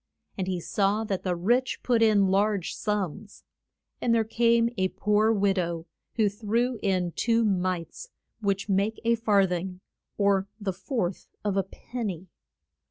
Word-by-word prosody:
And 190 -1 -3
he 185 -2 -1
saw 200 +4 0
that 195 -4 -2
the 180 -2 -1
rich 240 +9 +1
put 240 -2 +2
in 215 -3 +5
large 200 -1 +1
sums. 205 -1 -3 0.6
And 230 -1 +2
there 225 - +3
came 230 +1 +2
a 190 -1 +1
poor 210 +3 +2
wid 200 -3 +2
ow 170 -2 -2 0.3
who 220 -3 +3
threw 230 +4 -1
in 185 -3 0
two 230 +4 +1
mites, 185 - -2 0.3
which 200 -2 -1
make 200 +2 +1
a 235 - +4
far 210 -4 +3
thing, 180 0 -3 0.4
or 200 -1 +2
the 200 -3 -2
fourth 185 -1 -3 0.2
of 205 -2 0
a 195 - +3
pen 230 +4 -6
ny. 185 -1 -6
200 Hz, 160 wpm, -27 LUFS, 185-225 Hz, 0.6 s, in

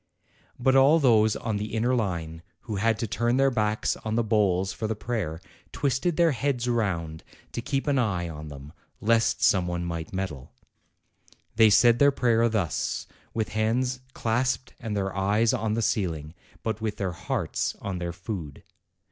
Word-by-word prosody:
But 130 +1 +2
all 135 +4 +6
those 110 -7 +4
on 110 -3 -2
the 105 +2 -4
inner 120 +3 +1
line, 85 -8 -2 0.2
who 110 -3 -5
had 110 +2 +2
to 115 - -2
turn 120 +3 0
their 135 0 +4
backs 110 -2 0
on 110 -3 -3
the 120 - +2
bowls 95 -4 +1
for 110 - -3
the 110 - -2
prayer, 105 -8 -3 0.3
twisted 140 +5 0
their 170 -2 +4
heads 125 -1 -1
round 85 -10 -1 0.3
to - - -4
keep 135 +2 -2
an 140 -3 +2
eye 95 -8 0
on 75 -1 -7
them, 70 0 -10 0.3
lest 115 +1 +2
some 90 -3 +4
one 85 0 -2
might 85 -1 -4
meddle. 95 -9 -5 1.0
They 110 -1 +6
said 120 +3 +5
their 140 - +7
prayer 115 -4 +2
thus, 95 -10 -1 0.3
with 110 -1 -1
hands 125 +4 0 0.2
clasped 125 +2 -1
and 110 -3 -3
their 95 -1 -2
eyes 105 +5 +2
on 110 -3 0
the 115 - 0
ceiling, 80 -8 -1 0.3
but 110 -1 -2
with 105 -1 -2
their 95 -3 -1
hearts 95 - -2
on 95 -2 -4
their 85 -1 -3
food. 85 -5 -7
110 Hz, 175 wpm, -26 LUFS, 95-120 Hz, 1.0 s, their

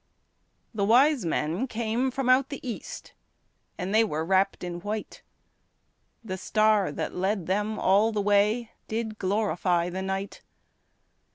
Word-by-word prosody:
The 210 -3 -1
wise 250 - +4
men 165 - -1
came 235 +2 -1
from 260 0 -3
out 260 +2 +4
the 280 -2 -7
east, 250 - -7 0.6
And 190 +1 -3
they 220 +1 +5
were 160 -7 -2
wrapped 190 +2 +1
in 175 -1 -4
white; 210 +3 -5 1.0
The 190 -4 -5
star 215 -1 +2
that - - -4
led 190 0 -1
them 210 +4 -1
all 205 +4 +3
the 215 - -2
way 205 +3 +2 0.2
Did 220 -1 -4
glorify 185 -3 0
the 190 +1 -4
night. 195 +1 -4
210 Hz, 135 wpm, -27 LUFS, 190-225 Hz, 1.0 s, they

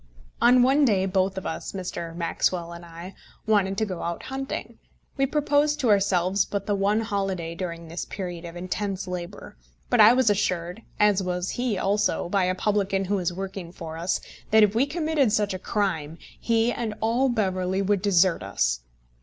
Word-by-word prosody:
On 245 +1 +6
one 275 +4 +4
day 200 -7 +3
both 190 0 0
of 190 - -5
us, 160 - -4
Mr. 170 -3 -5
Maxwell 170 0 -1
and 170 0 -10
I, 170 +3 -10 0.3
wanted 200 -3 +2
to 220 - +1
go 185 -4 -5
out 170 0 -4
hunting. 270 +1 -5 0.4
We 270 -1 +1
proposed 295 +1 +1
to 245 - +2
ourselves 195 -1 +2
but 200 -1 -4
the 205 - 0
one 200 +2 +1
holiday 195 -6 -2
during 170 -1 -6
this 165 +2 -5
period 180 -3 -6
of 170 0 -8
intense 190 +2 -3
labour; 180 - -7 0.3
but - - +5
I 220 +3 +9
was 250 -4 +4
assured, 180 -1 -1 0.2
as 210 -2 +4
was 180 0 -2
he 245 -5 -1
also, 200 -2 0
by 195 -1 +2
a 185 0 0
publican 195 -1 0
who 200 +2 0
was 180 -2 -1
working 190 -1 -6
for 165 -2 -8
us, 170 +3 -1 0.3
that 220 0 +6
if 210 -1 +3
we 245 +5 +2
committed 310 -6 +1
such 210 -2 +1
a 185 - -4
crime 175 -7 -2 0.2
he 230 0 +2
and 225 -3 -3
all 235 +4 +2
Beverley 190 -4 0
would 200 -1 +1
desert 185 - +3
us. - - 0
195 Hz, 185 wpm, -25 LUFS, 180-215 Hz, 0.4 s, I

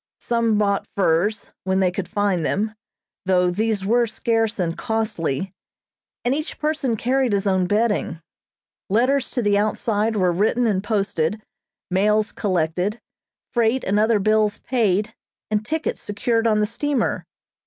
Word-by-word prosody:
Some 230 -2 +1
bought 200 -1 +1
furs, 195 +3 +1
when 190 0 +1
they 185 -2 +2
could 180 0 -4
find 200 -5 0
them, 215 +7 -1 0.5
though 180 -1 +3
these 210 +1 -1
were 235 +3 +3
scarce 225 0 0
and 170 -3 -1
costly, 195 - -2 0.7
and 245 - +2
each 305 +2 -4
person 300 -6 -1
carried 255 0 +1
his 200 0 0
own 190 -2 +2
bedding. 205 -5 0 0.7
Letters 255 +6 +2
to 245 - -2
the 205 -1 +3
outside 215 +1 0
were 185 -3 +2
written 215 +7 +1
and 200 -4 +1
posted, 200 -3 0 0.5
mails 210 +3 +2
collected, 185 +2 -1 0.5
freight 235 +2 +2
and 200 +2 +1
other 220 +1 +3
bills 215 +1 +2
paid, 215 -3 0 0.4
and 210 0 +1
tickets 320 +7 -2
secured 225 +3 0
on 215 -1 +3
the - - +3
steamer. 255 +3 -1
210 Hz, 145 wpm, -22 LUFS, 195-230 Hz, 0.7 s, though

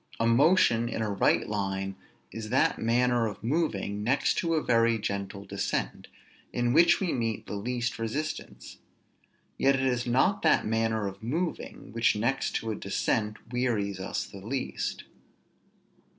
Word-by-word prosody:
A 115 - +2
motion 120 -2 +4
in 110 - -2
a 105 - -1
right 100 - +2
line 95 -2 -2 0.4
is 110 -1 -6
that 130 - +2
manner 120 0 +2
of 105 -2 -8
moving, 110 - -1
next 130 +5 +2
to 165 -1 0
a 155 - 0
very 115 -1 +3
gentle 100 -1 -4
descent, - - -3 0.4
in 120 0 0
which 170 +3 +6
we 185 -4 0
meet 115 -4 -2
the - - -7
least 120 +4 -2
resistance; 140 +8 -5 0.8
yet 135 0 +4
it 135 0 0
is 125 -1 0
not 185 +12 +2
that - - +3
manner 110 -1 0
of 100 0 -6
moving, 160 - -4
which 115 -1 +3
next 120 +6 -1
to 115 - -1
a - - -2
descent, 105 +2 -1 0.2
wearies 110 -6 0
us 95 - -3
the 100 -2 -11
least. 130 +5 -3
115 Hz, 150 wpm, -28 LUFS, 105-125 Hz, 0.8 s, which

